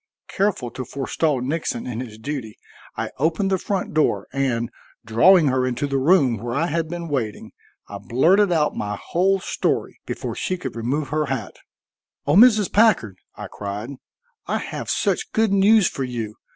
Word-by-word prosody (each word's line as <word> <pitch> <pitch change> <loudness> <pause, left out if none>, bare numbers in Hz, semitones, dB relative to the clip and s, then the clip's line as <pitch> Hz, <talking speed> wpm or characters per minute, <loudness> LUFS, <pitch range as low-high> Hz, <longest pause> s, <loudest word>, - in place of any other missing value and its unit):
Careful 190 - -1
to 130 - -5
forestall 140 +2 -1
Nixon 135 -3 -2
in 120 -2 -4
his 115 -4 -7
duty, 110 -2 -6 0.4
I - - -3
opened 165 +6 +1
the 190 - +2
front 195 0 -3
door, 155 0 +1
and, 125 -4 -1 0.3
drawing 155 - +5
her 130 0 +1
into 130 +3 -1
the 135 -1 -1
room 135 -5 +3
where 120 +3 -4
I 160 +4 +1
had 165 0 -2
been 170 0 -5
waiting, 125 -8 -3 0.4
I - - -7
blurted 180 - +3
out 155 -3 +1
my 105 0 -3
whole 190 +3 +1
story - - -2
before - - -4
she 185 - -2
could 130 -9 -6
remove 130 +5 -2
her 155 0 0
hat. 130 -4 -4 0.7
"O 145 - +2
Mrs. 215 -2 +6
Packard," 200 - +3 0.2
I - - -7
cried, 105 +3 -6 0.6
"I - - 0
have - - -6
such 445 - 0
good 220 -2 +2
news 200 0 +5
for 135 - -3
you. 115 -4 -4
145 Hz, 170 wpm, -22 LUFS, 120-180 Hz, 0.7 s, Mrs